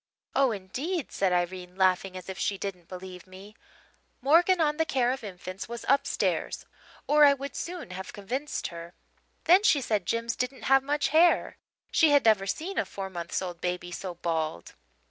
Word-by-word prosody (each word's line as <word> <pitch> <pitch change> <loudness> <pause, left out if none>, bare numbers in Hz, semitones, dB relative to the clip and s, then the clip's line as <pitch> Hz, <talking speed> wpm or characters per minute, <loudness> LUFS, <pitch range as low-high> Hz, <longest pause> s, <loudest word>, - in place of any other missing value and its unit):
"'Oh, 275 -1 +4
indeed!' 255 - -4
said 195 -2 +1
Irene, 180 0 -2
laughing 185 0 +1
as 185 - -10
if 190 0 -6
she 200 - 0
didn't 180 -4 -6
believe 185 0 -9
me. 195 +3 -13 0.6
'Morgan 340 +7 +4
on 300 -2 +2
the 320 - +3
Care 255 -5 +1
of 265 -2 -4
Infants' 185 0 -7
was 235 0 -6
upstairs 275 +1 0 0.4
or 300 0 +5
I 285 -1 +7
would 280 +1 -7
soon 340 - -5
have 190 +1 -7
convinced 255 +9 -4
her. 170 +1 -10 0.5
Then 360 +4 +6
she 360 -9 +4
said 210 -8 -1
Jims 230 0 -1
didn't 250 +2 -3
have 270 0 +5
much 290 0 0
hair 330 +4 +3 0.3
she 320 - +5
had 285 -3 +4
never 210 -3 +4
seen 360 - -2
a - - 0
four 195 -1 -6
months' 170 +1 -3
old 175 -2 -6
baby 180 0 -3
so 180 0 -5
bald. 160 - -3
205 Hz, 180 wpm, -28 LUFS, 185-280 Hz, 0.6 s, I